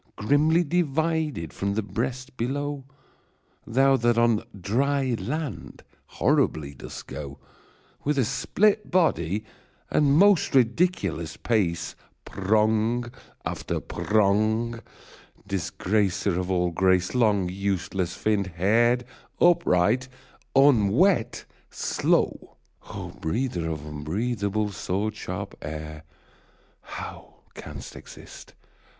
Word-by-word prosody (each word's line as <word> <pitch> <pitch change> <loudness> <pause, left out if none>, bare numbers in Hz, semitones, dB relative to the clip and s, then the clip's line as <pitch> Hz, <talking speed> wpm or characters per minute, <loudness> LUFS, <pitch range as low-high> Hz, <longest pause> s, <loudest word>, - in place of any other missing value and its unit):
Grimly 150 +9 +3
divided 160 - -1
from 100 0 -2
the 110 - 0
breast 125 +6 -4
below! 140 +3 -3 0.8
Thou 135 +3 +4
that 120 -1 +2
on 115 -2 +3 0.2
dry 130 +7 +1
land 150 - -5 0.3
horribly 70 -2 +1
dost 65 - -9
go 70 -2 -7 0.7
With 145 0 0
a 130 - +3
split 200 - +1
body 110 - +1 0.5
and 145 -1 +4
most 195 -5 +4
ridiculous 120 - +1
pace, 95 -8 0 0.3
Prong 110 +4 +1 0.3
after - - -3
prong, 110 +3 +1 0.7
disgracer 95 0 0
of 90 0 -3
all 90 -2 +1
grace, 95 +1 +2
Long 105 -7 +2
useless 95 -1 -2
finn'd, 105 -3 0
hair'd, 115 +8 +2 0.3
upright, 125 - +3 0.5
unwet, 130 - +4 0.2
slow! - - 0 0.6
breather 90 -2 -2
of 75 -2 -5
unbreathable, 100 +7 -2
sword 100 +3 -2
sharp - - -6
air, 75 0 -7 0.8
How - - -9
canst - - -9
exist - - -12
110 Hz, 95 wpm, -25 LUFS, 95-135 Hz, 0.8 s, Thou